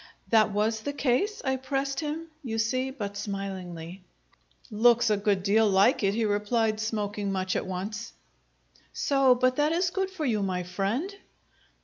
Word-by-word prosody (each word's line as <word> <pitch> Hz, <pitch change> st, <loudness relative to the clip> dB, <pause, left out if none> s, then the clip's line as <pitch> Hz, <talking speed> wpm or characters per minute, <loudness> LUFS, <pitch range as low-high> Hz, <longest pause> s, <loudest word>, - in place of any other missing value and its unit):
"That 220 Hz, -2 st, +4 dB
was 215 Hz, +2 st, 0 dB
the 285 Hz, +5 st, -3 dB
case?" 290 Hz, -, 0 dB
I 265 Hz, 0 st, +1 dB
pressed 270 Hz, +1 st, -2 dB
him, 315 Hz, +1 st, -3 dB, 0.2 s
you 225 Hz, -4 st, -3 dB
see, 255 Hz, +4 st, 0 dB
but 205 Hz, -7 st, -5 dB
smilingly. 190 Hz, -3 st, -6 dB, 0.7 s
"Looks 235 Hz, +1 st, +4 dB
a -, -, +4 dB
good 200 Hz, -2 st, 0 dB
deal 215 Hz, +2 st, +4 dB
like 200 Hz, +6 st, +4 dB
it," 200 Hz, 0 st, +1 dB
he 230 Hz, 0 st, +1 dB
replied, 215 Hz, +1 st, +1 dB
smoking 210 Hz, -2 st, -2 dB
much 185 Hz, -1 st, -1 dB
at -, -, -2 dB
once. 210 Hz, +5 st, -5 dB, 0.8 s
"So? 275 Hz, -3 st, +3 dB
But 255 Hz, +1 st, +1 dB
that 295 Hz, +1 st, +2 dB
is 355 Hz, +1 st, +1 dB
good 385 Hz, 0 st, -1 dB
for 375 Hz, -5 st, -4 dB
you, 220 Hz, -5 st, +1 dB
my 185 Hz, -2 st, -1 dB
friend!" 200 Hz, -, -2 dB
220 Hz, 160 wpm, -27 LUFS, 200-265 Hz, 0.8 s, That